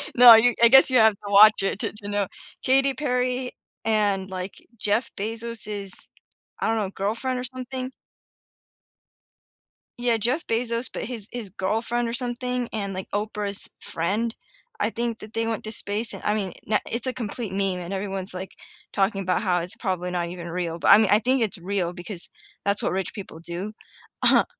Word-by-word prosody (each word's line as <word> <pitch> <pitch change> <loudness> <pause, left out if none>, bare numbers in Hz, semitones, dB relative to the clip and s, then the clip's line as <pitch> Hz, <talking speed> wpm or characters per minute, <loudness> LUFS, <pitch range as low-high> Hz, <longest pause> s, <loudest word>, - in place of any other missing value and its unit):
No, 245 0 +10
I 230 +1 +8
I 235 - +9
guess 265 +2 +8
you 255 - +4
have 220 -1 +6
to 200 0 -9
watch 210 0 +8
it 195 +1 -1
to - - 0
to 205 - -7
know 205 -1 0 0.4
Katy 270 +1 +4
Perry 250 -2 -1 0.3
and, 205 -3 +1
like, 185 +1 -5 0.2
Jeff 215 +3 +1
Bezos', 215 -2 -4 0.7
I - - 0
don't 225 - +1
know, 200 -3 -1
girlfriend 230 +7 -2
or 250 - -4
something? 255 +1 -5 2.1
Yeah, 240 -2 +2
Jeff 250 +9 0
Bezos, 235 +1 -1
but - - -4
his 230 -5 -6
his 235 -5 -5
girlfriend 225 +5 -1
or 230 - -3
something 250 0 -2
and 200 -3 -3
like, 185 0 -6
Oprah's 205 -1 -2
friend, 210 +8 -2 0.4
I 210 - +2
think 230 0 -3
that 215 +1 -11
they 225 0 0
went 225 -2 -2
to 215 - -3
space 215 +1 -1
and - - -8
I 210 - +2
mean, 200 -4 -2
na 210 -1 +2
it's 235 +2 -2
a 255 - 0
complete 230 -3 -4
meme, 195 -2 0
and 175 +3 -5
everyone's 195 -1 -3
like 185 +1 -6 0.4
talking 195 0 +1
about 185 -1 0
how 180 -4 +2
it's 175 +2 -5
probably 180 -2 -2
not 175 -1 -2
even 175 -1 -7
real, 170 -1 -3
but - - -1
I - - +11
mea 220 -1 +4
I 205 - +6
think 255 +3 +1
it's 220 -3 0
real 180 -1 -2
because 175 0 -8 0.4
that's 200 0 +2
what - - 0
rich 190 0 -2
people 190 -5 -8
do. 175 +5 -5 0.5
Uh-huh. - - +6
215 Hz, 190 wpm, -25 LUFS, 195-235 Hz, 2.1 s, I